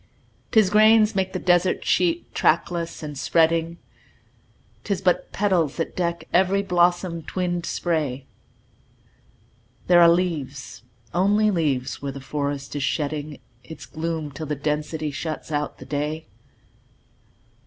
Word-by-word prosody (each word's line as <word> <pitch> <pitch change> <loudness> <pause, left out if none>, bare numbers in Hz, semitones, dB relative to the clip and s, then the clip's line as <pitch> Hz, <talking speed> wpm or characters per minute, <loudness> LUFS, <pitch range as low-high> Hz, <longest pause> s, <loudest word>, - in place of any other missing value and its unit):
'Tis 215 -4 +4
grains 215 0 +5
make 190 -1 0
the - - -3
desert 175 +1 +2
sheet, 175 -1 +1
trackless 170 0 0
and 150 -2 -6
spreading; 165 +2 +2 1.1
'Tis 200 -3 -1
but 185 -2 0
petals 185 -8 +1
that 165 - -3
deck 170 -1 -2
every 190 +2 +3
blossom 175 -2 +1
twinned 175 +1 -3
spray; 150 -6 -2 1.6
There 175 -1 +6
are 170 - +8
leaves 150 -9 -2 0.3
only 205 +4 +3
leaves 140 -7 -1
where 140 -1 -3
the 140 - -7
forest 140 0 -4
is 145 - -2
shedding 150 +1 -2 0.3
Its 150 -1 -10
gloom 155 +2 -4
till 150 +3 -7
the 150 - -2
density 150 +1 -2
shuts 160 +2 -5
out 150 0 -2
the - - -11
day. 150 +2 -3
165 Hz, 125 wpm, -23 LUFS, 150-180 Hz, 1.6 s, are